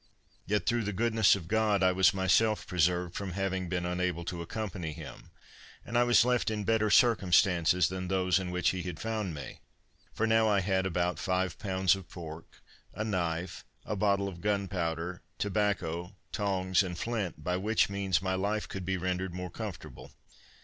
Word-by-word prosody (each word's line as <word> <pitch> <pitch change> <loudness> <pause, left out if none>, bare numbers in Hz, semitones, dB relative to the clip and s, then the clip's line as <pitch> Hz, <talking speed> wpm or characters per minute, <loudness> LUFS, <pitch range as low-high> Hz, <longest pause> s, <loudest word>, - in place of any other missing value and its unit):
Yet 105 -3 0
through 120 0 +1
the 105 - -2
goodness 110 0 +4
of 85 -5 -7
God, 105 -1 +2
I 95 - +5
was 95 -1 +5
myself 100 +3 +2
preserved 90 0 +1
from 95 -2 -4
having 95 -1 -2
been 90 -1 -1
unable 90 -1 -1
to 85 0 -4
accompany 90 -3 -4
him; - - -10 0.6
and 120 - -6
I 120 - +5
was 120 -1 +5
left 125 -2 +1
in 105 -1 -2
better 110 +1 +2
circumstances 90 -6 +4
than 95 0 -4
those 95 -1 +2
in 95 -1 -4
which 90 0 +1
he 95 - -2
had 90 -3 -6
found 110 -6 -3
me, 70 -4 -8 0.5
for 110 - -1
now 110 0 +4
I 100 -2 +3
had 95 0 +1
about 90 -2 -1
five 90 -1 -1
pounds 95 -2 +2
of 95 -3 -10
pork, 80 -2 -10 0.3
a 110 - -2
knife, 85 -4 -2 0.2
a 105 - -2
bottle 100 0 +1
of 85 -3 -8
gunpowder, 90 -4 -2 0.2
tobacco, 95 -4 -1 0.2
tongs 95 -4 +1
and 90 -3 -4
flint, 100 -8 -3
by 90 +2 0
which 110 +4 +2
means 100 -1 0
my 95 0 0
life 100 +3 -1
could 95 -2 -6
be 95 -1 0
rendered 90 0 -2
more 90 -1 -5
comfortable. - - -8
95 Hz, 175 wpm, -30 LUFS, 90-105 Hz, 0.6 s, I